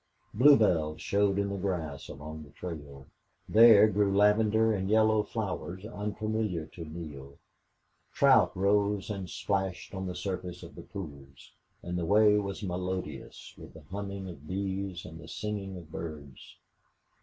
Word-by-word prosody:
Bluebells 100 Hz, -, +4 dB
showed 100 Hz, +3 st, +1 dB
in 100 Hz, 0 st, 0 dB
the 100 Hz, -, -3 dB
grass 85 Hz, -7 st, -3 dB
along 75 Hz, +2 st, -8 dB
the 75 Hz, -, -12 dB
trail; 70 Hz, -5 st, -8 dB, 0.4 s
there 110 Hz, -2 st, +8 dB
grew 100 Hz, -1 st, +2 dB
lavender 110 Hz, +2 st, +4 dB
and 95 Hz, -1 st, -2 dB
yellow 110 Hz, 0 st, +4 dB
flowers 100 Hz, -3 st, -4 dB
unfamiliar 105 Hz, -4 st, -2 dB
to 85 Hz, +2 st, -10 dB
Neale; 75 Hz, -4 st, -9 dB, 0.7 s
trout 130 Hz, -5 st, +5 dB
rose 100 Hz, +1 st, +1 dB
and 95 Hz, -3 st, -5 dB
splashed 95 Hz, -2 st, -2 dB
on 95 Hz, -1 st, -4 dB
the 90 Hz, -, -5 dB
surface 90 Hz, -2 st, -5 dB
of 85 Hz, -3 st, -10 dB
the -, -, -10 dB
pools; 70 Hz, -7 st, -10 dB, 0.3 s
and 90 Hz, 0 st, -3 dB
the 85 Hz, -, -2 dB
way 105 Hz, +2 st, +5 dB
was 100 Hz, 0 st, -5 dB
melodious 90 Hz, -5 st, -5 dB
with -, -, -12 dB
the 80 Hz, -, -12 dB
humming 100 Hz, -1 st, -5 dB
of 75 Hz, -5 st, -10 dB
bees 95 Hz, -1 st, -3 dB
and 80 Hz, 0 st, -10 dB
the -, -, -11 dB
singing 100 Hz, -3 st, -4 dB
of 85 Hz, -3 st, -12 dB
birds. 75 Hz, -6 st, -8 dB
95 Hz, 145 wpm, -30 LUFS, 80-105 Hz, 0.7 s, there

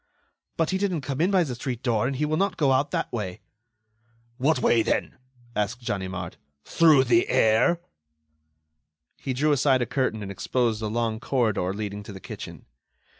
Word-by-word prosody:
"But 165 Hz, +1 st, +1 dB
he 190 Hz, -, 0 dB
didn't 185 Hz, -6 st, 0 dB
come 140 Hz, +1 st, -3 dB
in 175 Hz, -, +3 dB
by 190 Hz, -3 st, +4 dB
the 135 Hz, -6 st, -4 dB
street 120 Hz, 0 st, -5 dB
door, 120 Hz, -1 st, +1 dB
and 135 Hz, -, -2 dB
he 150 Hz, +3 st, 0 dB
will 155 Hz, +1 st, 0 dB
not 190 Hz, +1 st, 0 dB
go 140 Hz, -4 st, +3 dB
out 140 Hz, +2 st, +2 dB
that -, -, -3 dB
way." 95 Hz, -6 st, -4 dB, 1.0 s
"What 145 Hz, +5 st, +2 dB
way, 115 Hz, -, +3 dB
then?" -, -, -1 dB, 0.4 s
asked 105 Hz, +4 st, -2 dB
Ganimard. 95 Hz, -3 st, -4 dB, 0.3 s
"Through 155 Hz, -5 st, +5 dB
the 120 Hz, -2 st, +3 dB
air?" 110 Hz, +11 st, +3 dB, 1.4 s
He 135 Hz, -, -3 dB
drew 150 Hz, +4 st, +1 dB
aside 135 Hz, -2 st, +3 dB
a -, -, -2 dB
curtain 110 Hz, -4 st, -1 dB
and 100 Hz, -, -6 dB
exposed 115 Hz, +2 st, -1 dB
a 110 Hz, -, -2 dB
long 110 Hz, 0 st, -1 dB
corridor 115 Hz, -8 st, 0 dB
leading 105 Hz, 0 st, -5 dB
to 105 Hz, 0 st, -10 dB
the 95 Hz, -, -9 dB
kitchen. -, -, -9 dB
125 Hz, 175 wpm, -25 LUFS, 110-145 Hz, 1.4 s, Through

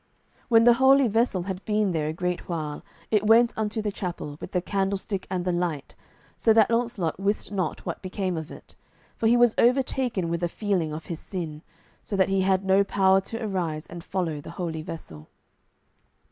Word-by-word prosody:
When 230 Hz, -1 st, +6 dB
the 240 Hz, 0 st, +7 dB
holy 270 Hz, 0 st, +6 dB
vessel 225 Hz, -4 st, +1 dB
had 190 Hz, 0 st, -5 dB
been 210 Hz, -2 st, +1 dB
there 155 Hz, -3 st, -1 dB
a -, -, -1 dB
great 180 Hz, +2 st, -3 dB
while, 155 Hz, -3 st, -4 dB, 0.3 s
it 210 Hz, -1 st, +2 dB
went 230 Hz, +2 st, +5 dB
unto 220 Hz, 0 st, -2 dB
the 210 Hz, -, -1 dB
chapel, 175 Hz, -6 st, -5 dB
with -, -, -7 dB
the 180 Hz, -, +1 dB
candlestick 195 Hz, +1 st, -2 dB
and 180 Hz, -1 st, -2 dB
the 180 Hz, -, +1 dB
light, 175 Hz, -5 st, -2 dB, 0.4 s
so 225 Hz, -, +3 dB
that 220 Hz, 0 st, +4 dB
Launcelot 230 Hz, -8 st, -1 dB
wist 200 Hz, +1 st, -1 dB
not 185 Hz, -6 st, -3 dB
what -, -, -4 dB
became 185 Hz, -1 st, -3 dB
of 160 Hz, -1 st, -5 dB
it, -, -, -12 dB, 0.4 s
for 225 Hz, -, 0 dB
he 235 Hz, +2 st, +5 dB
was 240 Hz, -2 st, +5 dB
overtaken 245 Hz, -6 st, +2 dB
with 170 Hz, +1 st, -2 dB
a 175 Hz, -, 0 dB
feeling 185 Hz, -5 st, -1 dB
of 155 Hz, +1 st, -6 dB
his 165 Hz, -2 st, -5 dB
sin, 160 Hz, -5 st, -6 dB, 0.4 s
so 205 Hz, -, -4 dB
that 190 Hz, -1 st, +3 dB
he 195 Hz, 0 st, +2 dB
had 190 Hz, 0 st, +1 dB
no 190 Hz, +1 st, +4 dB
power 190 Hz, -1 st, +3 dB
to 225 Hz, +4 st, -6 dB
arise 170 Hz, -6 st, -2 dB
and 175 Hz, -1 st, -9 dB
follow 165 Hz, -6 st, -2 dB
the -, -, -10 dB
holy 165 Hz, -3 st, -3 dB
vessel. 80 Hz, -, -9 dB
190 Hz, 195 wpm, -26 LUFS, 170-215 Hz, 0.4 s, the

